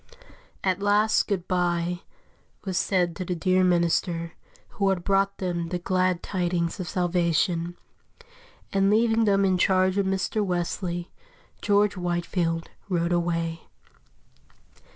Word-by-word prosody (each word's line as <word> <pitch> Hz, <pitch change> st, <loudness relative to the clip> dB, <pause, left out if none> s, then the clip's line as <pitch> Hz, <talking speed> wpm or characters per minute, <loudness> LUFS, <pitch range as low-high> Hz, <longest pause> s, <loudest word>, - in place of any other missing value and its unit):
At 190 Hz, 0 st, 0 dB
last 205 Hz, +2 st, +3 dB
"good 190 Hz, -4 st, -2 dB
bye" 175 Hz, -1 st, 0 dB, 0.7 s
was 190 Hz, -2 st, -3 dB
said 180 Hz, -3 st, +1 dB
to 185 Hz, -, -3 dB
the 180 Hz, 0 st, -3 dB
dear 185 Hz, +2 st, +2 dB
minister 170 Hz, -1 st, +1 dB, 0.4 s
who 200 Hz, -2 st, 0 dB
had 185 Hz, -2 st, 0 dB
brought 195 Hz, +1 st, +1 dB
them 175 Hz, -2 st, -2 dB
the 180 Hz, -, -2 dB
glad 185 Hz, 0 st, 0 dB
tidings 175 Hz, -1 st, -1 dB
of 175 Hz, -3 st, -4 dB
salvation, 175 Hz, 0 st, 0 dB, 1.0 s
and 195 Hz, 0 st, +3 dB
leaving 225 Hz, +1 st, +3 dB
them 200 Hz, -1 st, +3 dB
in 185 Hz, -1 st, +2 dB
charge 185 Hz, +1 st, +3 dB
of 195 Hz, -, +1 dB
Mr. 195 Hz, +3 st, 0 dB
Wesley, 175 Hz, -1 st, -3 dB, 0.5 s
George 205 Hz, -1 st, +2 dB
Whitefield 175 Hz, -1 st, -2 dB, 0.2 s
rode 170 Hz, -1 st, 0 dB
away. 170 Hz, -1 st, -1 dB
180 Hz, 125 wpm, -25 LUFS, 175-195 Hz, 1.0 s, last